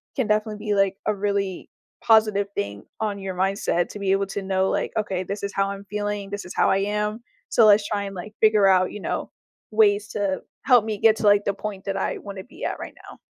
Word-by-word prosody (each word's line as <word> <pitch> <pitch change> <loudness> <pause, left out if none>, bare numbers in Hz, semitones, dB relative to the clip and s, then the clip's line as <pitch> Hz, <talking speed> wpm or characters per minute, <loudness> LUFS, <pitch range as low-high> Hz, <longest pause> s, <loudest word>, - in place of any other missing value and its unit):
can, 260 -5 0
definitely, 215 0 0
be 210 - +1
like, 195 -1 +2
a 215 - +1
really 200 -2 -2 0.3
positive 215 -3 +4
thing 100 0 -4 0.2
on 210 -2 -2
your 190 -1 -5
mindset 190 -2 0
to 205 - -8
be 195 -1 0
able 195 +1 +2
to 200 +1 -4
know, 190 0 0
like, - - -1
"Okay. 190 -4 -1
This 200 +3 -5
is 200 0 -3
how 195 0 +1
I'm 200 0 -7
feeling. 205 0 -3
This 205 0 -4
is 180 - -8
how - - +3
I - - +3
am, 210 +3 -2 0.3
so 230 - +5
let's 205 0 +5
try 205 -1 -1
and, 195 0 -7
like, 195 +4 -8
figure 215 -2 +5
out, 185 -1 +4
you 210 - -7
know, - - -3 0.4
ways 210 -1 +3
to 200 -2 -2 0.2
help 250 -4 +6
me 215 -2 -2
get 220 +1 +4
to, - - -5
like, 205 0 +5
the 200 - +1
point 200 -1 -6
that 195 - -2
I 190 - -1
wanna 200 -2 -8
be 250 - -9
at - - -3
right - - -8
now." - - -12
200 Hz, 240 wpm, -24 LUFS, 195-210 Hz, 0.4 s, help